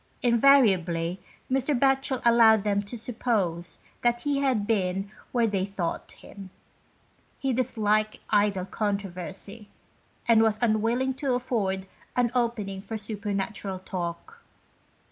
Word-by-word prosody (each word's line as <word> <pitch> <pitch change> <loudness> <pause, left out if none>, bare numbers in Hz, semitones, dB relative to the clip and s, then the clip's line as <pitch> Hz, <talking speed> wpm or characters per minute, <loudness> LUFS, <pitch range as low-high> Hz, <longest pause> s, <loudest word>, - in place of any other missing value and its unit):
Invariably 195 -9 +4 0.3
Mr. 270 +1 +1
Batchel 270 -1 +1
allowed 225 -3 +6
them 205 -1 +1
to 205 +4 -6
suppose 215 -7 -2 0.2
that 240 0 +1
he 285 0 0
had 260 -7 +1
been 195 -2 -1 0.2
where 240 -2 +2
they 200 -4 0
thought 195 -3 -4
him. 195 -2 -12 0.9
He 270 -1 -1
disliked 215 -3 +1
idle 205 -3 +2
controversy, 200 +1 -4 0.6
and 230 -2 +6
was 220 -1 +3
unwilling 235 +3 +1
to 270 -3 +1
afford 200 -7 -1 0.3
an 245 -2 +2
opening 225 -6 -1
for 220 +2 -5
super 210 -1 -5
natural 195 -1 -3
talk. 185 - -6
215 Hz, 120 wpm, -27 LUFS, 195-240 Hz, 0.9 s, allowed